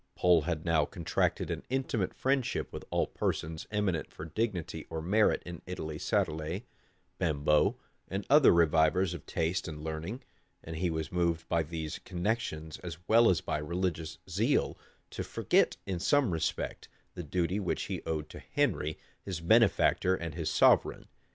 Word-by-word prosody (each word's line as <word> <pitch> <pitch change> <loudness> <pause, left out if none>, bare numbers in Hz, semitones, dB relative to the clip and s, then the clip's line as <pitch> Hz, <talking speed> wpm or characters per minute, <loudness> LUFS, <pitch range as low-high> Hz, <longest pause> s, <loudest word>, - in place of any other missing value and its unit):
Pole 90 -3 +4
had 80 0 -3
now 80 -3 +3
contracted 85 +2 -1
an - - -3
intimate 130 -6 -1
friendship 130 -2 0
with - - -6
all - - +1
persons 80 +1 -3
eminent 105 -6 -1
for 75 - -8
dignity 85 -4 -3
or 80 - -3
merit 100 +7 +2
in 85 0 -7
Italy 80 -4 -5
Sadolet, 80 +7 -1 0.6
Bembo, 75 -1 +2 0.3
and 95 +1 -4
other 145 -1 +7
revivers 85 +2 +3
of 85 - -9
true - - -12
taste 85 +4 0
and 75 -2 -7
learning; 80 +11 -5 0.4
and 80 0 -6
he 90 +1 0
was 80 -1 -3
moved 85 -2 0
by 85 -1 +2
these 80 -1 -5
connections, 85 -5 -3
as 85 -3 -7
well 115 +1 +6
as 90 -4 +2
by - - -2
religious 80 0 -2
zeal, 105 - +1 0.4
to - - -4
forget, - - +2
in 95 -3 -2
some 135 - +3
respect, 80 -1 -2 0.3
the - - -6
duty 90 +4 -1
which 95 - -1
he - - -4
owed 75 -1 -2
to - - -9
Henry, 75 0 -1 0.2
his 95 -4 -4
benefactor 95 -1 +4
and 85 -3 -5
his 80 -1 -2
sovereign. - - +4
85 Hz, 160 wpm, -31 LUFS, 80-95 Hz, 0.6 s, other